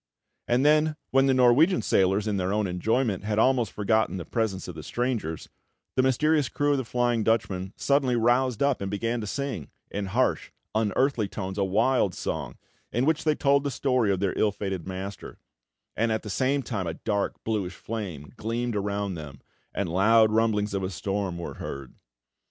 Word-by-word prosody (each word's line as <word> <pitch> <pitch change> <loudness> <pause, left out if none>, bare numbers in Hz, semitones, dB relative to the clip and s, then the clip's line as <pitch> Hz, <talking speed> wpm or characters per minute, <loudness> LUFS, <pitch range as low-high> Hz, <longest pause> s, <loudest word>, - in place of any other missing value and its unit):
And 125 +3 +2
then, 155 +1 +4 0.2
when 135 +1 +4
the 135 - +4
Norwegian 130 +9 +4
sailors, 95 +2 +2
in 105 -2 0
their 95 0 -1
own 105 0 +1
enjoyment, 100 +4 0
had 105 0 -1
almost 120 -2 +3
forgotten 110 -1 +1
the 85 - -6
presence 110 -1 -2
of - - -6
the - - -8
strangers, 120 -10 -3 0.5
the 130 - +4
mysterious 145 +1 +2
crew 145 +5 +1
of 140 - +2
the - - -2
Flying 120 -1 +1
Dutchman 95 -4 0
suddenly 140 -3 +2
roused 120 +1 +2
up 140 -5 +1
and 100 - -2
began 115 +4 -2
to 105 - -5
sing, 130 - -4 0.2
in 100 -1 -3
harsh, 95 - 0 0.2
unearthly 110 +2 +1
tones, 95 0 -5
a - - +3
wild 105 0 +2
song, - - -4 0.3
in 120 +3 +1
which 160 +1 +1
they 155 -1 +3
told 140 -1 +3
the 145 - -1
story 125 -5 +1
of 95 - 0
their 95 -1 0
ill 105 - +3
fated 95 -4 -4
master; 95 +1 -6 0.6
and 115 +1 +1
at 110 - -1
the 105 - -5
same 135 +6 +1
time 100 -8 -3
a 80 - -3
dark, 100 0 -1
bluish 100 -5 -2
flame 95 -10 -6
gleamed 115 +1 -2
around 100 -1 -2
them, 75 -5 -8 0.3
and 100 - -2
loud 110 +5 +4
rumblings 110 -2 +1
of 100 - -1
a 95 - -2
storm 95 -2 -3
were 85 - -5
heard. 70 -2 -6
110 Hz, 185 wpm, -26 LUFS, 95-125 Hz, 0.6 s, then